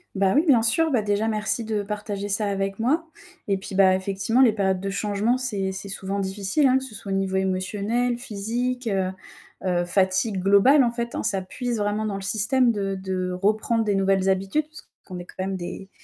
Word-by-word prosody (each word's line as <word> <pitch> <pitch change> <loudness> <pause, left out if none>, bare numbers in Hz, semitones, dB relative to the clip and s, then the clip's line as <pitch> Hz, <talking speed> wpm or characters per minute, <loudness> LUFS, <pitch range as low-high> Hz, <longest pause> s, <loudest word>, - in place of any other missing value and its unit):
Bah 195 -1 +2
oui, 300 +5 +3
bien 255 -6 +6
sûr, 310 +9 +2
bah 245 -5 +2
déjà 205 +1 0
merci 215 +1 -1
de 215 -2 -1
partager 205 -1 -4
ça 210 +1 0
avec 195 0 -2
moi 295 +9 +1 0.4
et 195 - +2
puis, 195 +1 -7
bah 190 -1 +5
effectivement 195 +5 -1
les 235 -5 +6
périodes 190 -3 0
de 195 +1 -3
changement, 210 +4 0
c'est 205 -7 -2
c'est 195 +1 -7
souvent 195 +1 -3
difficile, 195 +9 +1
hein, 260 0 +4
que 265 - -3
ce 230 -5 -10
soit 200 -1 -7
au - - +1
niveau 195 0 -1
émotionnel, 200 +6 0
physique, 240 +2 -3
heu 190 -3 0 0.5
heu, 175 -1 +1
fatigue 190 +2 +1
globale, 200 +9 +5
en 235 - +1
fait, 235 0 -4
hein. - - -2
Ça 200 -3 0
puise 235 +5 -4
vraiment 205 +1 -1
dans 205 -2 -2
le 195 - -5
système 235 +5 +2
de 195 -3 -2
de 190 -1 -3
reprendre 215 +4 +1
des 210 -2 0
nouvelles 195 0 +2
habitudes 195 +11 0
puisqu'on 210 -11 -12
est 175 - -8
quand 185 - -6
même 190 0 -2
des 180 +2 -7
200 Hz, 210 wpm, -24 LUFS, 195-230 Hz, 0.5 s, bien